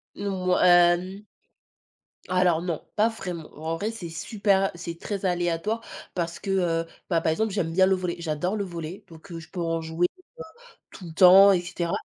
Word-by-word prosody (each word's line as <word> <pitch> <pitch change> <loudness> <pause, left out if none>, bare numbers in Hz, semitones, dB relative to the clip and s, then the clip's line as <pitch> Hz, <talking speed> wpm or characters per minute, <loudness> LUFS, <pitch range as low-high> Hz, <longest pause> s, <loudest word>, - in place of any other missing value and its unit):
Mouais, 185 -2 -1
hem. 175 +3 +4 1.1
Alors 180 -2 +2
non, 170 -4 -3
pas 215 +2 +4
vraiment, 180 -8 -6
en 160 +1 -3
vrai 210 +5 -2
c'est 210 -7 -7
super 195 +3 0
c'est 170 -1 -7
très 200 -2 -5
aléatoire 175 +4 -1 0.3
parce 170 -2 -3
que, 195 - -6
heu, 170 -3 0 0.2
bah, 165 -1 +2
par 160 - +1
exemple, 220 +5 -1
j'aime 175 -5 -2
bien 185 +2 +4
le 190 0 +3
volley 180 -2 -3
j'adore 165 +4 -2
le 205 - -1
volley 175 +2 -7
donc 165 +4 -15
heu, 165 - -6
je 160 - -14
peux 180 - -6
en 165 0 -1
jouer 160 +2 0 0.9
tout 185 - -11
le 165 - -9
temps 190 +3 +8
et 180 - +2
cetera. 175 -1 -3
180 Hz, 185 wpm, -25 LUFS, 165-195 Hz, 1.1 s, temps